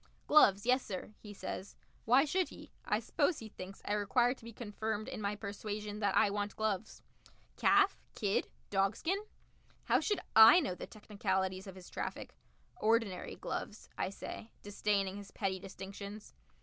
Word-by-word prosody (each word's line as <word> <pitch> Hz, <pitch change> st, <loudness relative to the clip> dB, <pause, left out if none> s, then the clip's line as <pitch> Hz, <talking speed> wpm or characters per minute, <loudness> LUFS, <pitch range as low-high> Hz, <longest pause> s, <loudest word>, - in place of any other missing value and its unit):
"Gloves, 205 Hz, -10 st, +6 dB
yessir," 240 Hz, -6 st, 0 dB
he 210 Hz, -, -10 dB
says. 200 Hz, -1 st, -6 dB, 0.3 s
Why 255 Hz, +5 st, +6 dB
should 360 Hz, +4 st, +1 dB
he? -, -, -12 dB
I -, -, +1 dB
suppose 355 Hz, -, +1 dB
he 220 Hz, -, -8 dB
thinks 190 Hz, -1 st, -10 dB
I 205 Hz, -, 0 dB
require 235 Hz, +4 st, +3 dB
to 260 Hz, -, -19 dB
be 230 Hz, -, -8 dB
confirmed 215 Hz, -1 st, -4 dB
in -, -, -5 dB
my 205 Hz, 0 st, -1 dB
persuasion 210 Hz, 0 st, -5 dB
that 200 Hz, -2 st, +2 dB
I 200 Hz, -, +5 dB
want 205 Hz, 0 st, -2 dB
gloves. 215 Hz, -1 st, -2 dB, 0.5 s
"Calf -, -, +4 dB, 0.2 s
kid 205 Hz, -3 st, 0 dB, 0.2 s
dogskin?" 205 Hz, -, +1 dB, 0.6 s
How -, -, +3 dB
should 415 Hz, -, 0 dB
I 225 Hz, +9 st, +10 dB
know 280 Hz, -, -1 dB
the -, -, -7 dB
technicalities 190 Hz, -3 st, -2 dB
of 190 Hz, -, -8 dB
his 185 Hz, -1 st, -12 dB
traffic? -, -, -5 dB, 0.4 s
"Ordinary 220 Hz, -4 st, +1 dB
gloves," 210 Hz, -, -5 dB
I -, -, -1 dB
say, 205 Hz, +3 st, -7 dB
disdaining 200 Hz, -1 st, 0 dB
his 200 Hz, -1 st, -9 dB
petty 190 Hz, -2 st, -2 dB
distinctions. 200 Hz, +2 st, -8 dB
205 Hz, 155 wpm, -34 LUFS, 195-225 Hz, 0.6 s, I